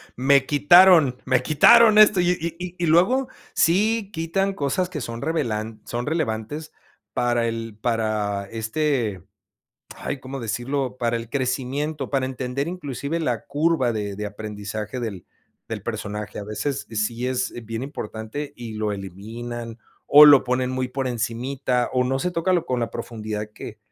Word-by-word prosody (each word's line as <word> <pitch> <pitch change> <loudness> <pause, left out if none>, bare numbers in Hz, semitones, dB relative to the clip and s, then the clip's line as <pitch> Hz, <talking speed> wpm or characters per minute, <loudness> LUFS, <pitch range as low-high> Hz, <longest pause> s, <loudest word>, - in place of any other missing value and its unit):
Me 135 +1 +4
quitaron 155 -2 +6
me 130 -1 +2
quitaron 220 - +6
esto, 210 -3 +7
y 175 0 +3 0.3
y 180 0 -6
y 175 - -1
luego 200 +12 +3 0.3
sí 205 +5 +2
quitan 185 +4 -1
cosas 180 +2 -1
que 160 -5 -5
son 115 -1 -6
revelan 115 -9 -2
son 120 +1 -3
relevantes 150 -1 -3 0.4
para 120 -1 +1
el 115 -2 -5
para 110 -4 -1
este, 115 - -1 0.7
ay, 140 -2 -5
¿cómo 135 +1 -7
decirlo? 125 +3 -2
Para 120 -1 0
el 115 0 -7
crecimiento, 135 +2 -2
para 135 -2 0
entender 130 +3 -3
inclusive 155 -2 -4
la 125 -7 -1
curva 145 -4 +1
de 105 -2 -4
de 105 +1 -4
aprendizaje 105 +2 -6
del 105 -7 -5 0.4
del - - -5
personaje, 105 +1 -5
a 100 - -7
veces 110 +7 -3
sí 115 +3 -1
es 130 -1 -1
bien 115 +2 -5
importante 115 +1 -6
y 115 -2 -7
lo 110 0 -1
eliminan, 115 +5 -7 0.3
o 150 +1 +9
lo 145 -2 +8
ponen 125 0 0
muy 130 0 -2
por 130 +1 -3
encimita, 125 +2 -1
o 125 - +2
no 135 +1 0
se 180 +4 -2
toca, 170 +2 0
lo 175 -2 +1
con 125 -1 -1
la 115 - -2
profundidad 110 -3 -5
que 105 - -9
125 Hz, 155 wpm, -23 LUFS, 110-150 Hz, 0.7 s, o